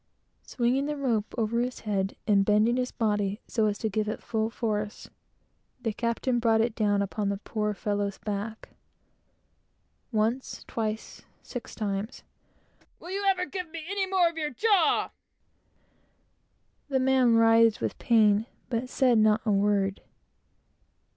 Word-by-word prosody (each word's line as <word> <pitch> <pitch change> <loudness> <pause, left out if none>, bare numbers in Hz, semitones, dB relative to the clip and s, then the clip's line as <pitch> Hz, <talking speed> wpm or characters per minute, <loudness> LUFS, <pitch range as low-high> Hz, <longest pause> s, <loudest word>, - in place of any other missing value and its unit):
Swinging 255 +3 0
the 300 0 -3
rope 235 -7 -1
over 230 0 0
his 250 +1 -2
head, 195 -2 -1
and 200 -2 +4
bending 215 +4 +3
his 250 0 -1
body 205 -2 -1
so 220 -2 +1
as 205 -1 -1
to 220 - -2
give 215 0 -1
it 215 - -4
full 220 -1 -1
force, 210 -3 -3 0.7
the 225 -3 -2
captain 235 +2 -1
brought 225 -1 +3
it 225 0 +1
down 205 -2 +1
upon 200 +1 -2
the 200 - -1
poor 210 0 -3
fellow's 205 -1 -2
back. 210 +1 -5 1.4
Once, 225 +4 -1
twice 220 -1 -4 0.2
six 245 -3 -8
times. 205 +1 -3 0.8
"Will 355 - -9
you 400 +1 -2
ever 365 -2 +1
give 365 -3 -6
me 325 0 -7
any 390 0 -1
more 375 -2 +3
of 335 -1 -4
your 300 -1 -1
jaw?" 375 - +2 1.8
The 270 -2 +1
man 255 -2 +4
writhed 225 -1 +5
with - - -3
pain, 215 -1 +3 0.2
but 240 +2 -2
said 250 -4 +3
not 215 0 +4
a 215 - +2
word. 200 -1 +1
225 Hz, 145 wpm, -27 LUFS, 210-255 Hz, 1.8 s, writhed